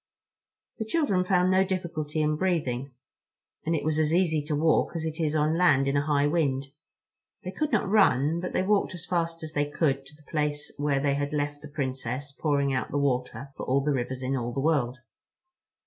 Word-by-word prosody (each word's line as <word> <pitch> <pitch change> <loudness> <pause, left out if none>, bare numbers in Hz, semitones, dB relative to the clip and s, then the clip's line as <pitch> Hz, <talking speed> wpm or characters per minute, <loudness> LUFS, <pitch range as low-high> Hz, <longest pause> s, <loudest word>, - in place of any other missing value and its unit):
The 220 - -2
children 220 - +1
found 180 0 +2
no 190 0 +5
difficulty 165 -5 -2
in 150 0 +1
breathing, 145 -7 -1 0.8
and 165 - +2
it 155 - -2
was 155 0 0
as 155 -1 +2
easy 165 -3 +2
to 150 -1 -1
walk 160 +3 +2
as 160 -1 -2
it 160 +1 -4
is 155 -2 0
on 155 +1 +2
land 140 -7 +4
in 140 - +1
a 140 - +2
high 145 -1 +3
wind. 140 -4 0 0.7
They 185 - -4
could 305 +7 -2
not 225 -5 +1
run, 165 - +3
but 180 - -4
they - - +1
walked 200 -1 +1
as 170 - -8
fast 165 -2 -2
as 155 0 -7
they 145 -1 0
could 140 -3 0
to 150 - -13
the 150 -1 -21
place 150 -1 -2
where 145 -1 +1
they 140 0 +1
had 145 +1 -2
left 145 0 -2
the 150 - -9
Princess 135 -1 -4
pouring 140 -1 0
out 130 - -1
the - - -2
water 135 0 -1
for - - -6
all 135 +2 +2
the 150 +2 0
rivers 130 0 -3
in 130 +1 0
all 120 -2 -2
the 135 - -3
world. 135 -4 +1
150 Hz, 210 wpm, -27 LUFS, 140-170 Hz, 0.8 s, no